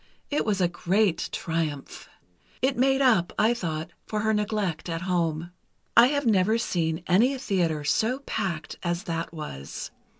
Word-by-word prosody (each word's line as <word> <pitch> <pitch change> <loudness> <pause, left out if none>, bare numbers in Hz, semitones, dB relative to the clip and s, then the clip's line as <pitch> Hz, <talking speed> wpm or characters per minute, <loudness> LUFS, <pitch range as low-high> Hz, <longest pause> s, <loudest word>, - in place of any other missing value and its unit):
It 290 - +1
was 205 -3 +1
a 180 - +4
great 180 +1 +1
triumph. 160 -4 -3 0.5
It 265 0 +3
made 270 +2 +3
up, 205 -10 +4
I 225 +2 +4
thought, 160 -8 -4 0.2
for 215 -1 -1
her 220 0 +2
neglect 205 -6 -1
at 165 +1 -3
home. 170 -2 -1 0.4
I 235 +1 +8
have 285 0 0
never 215 0 +3
seen 170 -7 -1
any 235 +10 +3
theatre 175 - 0
so 220 - +1
packed 165 -5 -3
as 175 0 -2
that 165 0 -3
was. 150 - -7
185 Hz, 155 wpm, -26 LUFS, 165-220 Hz, 0.5 s, I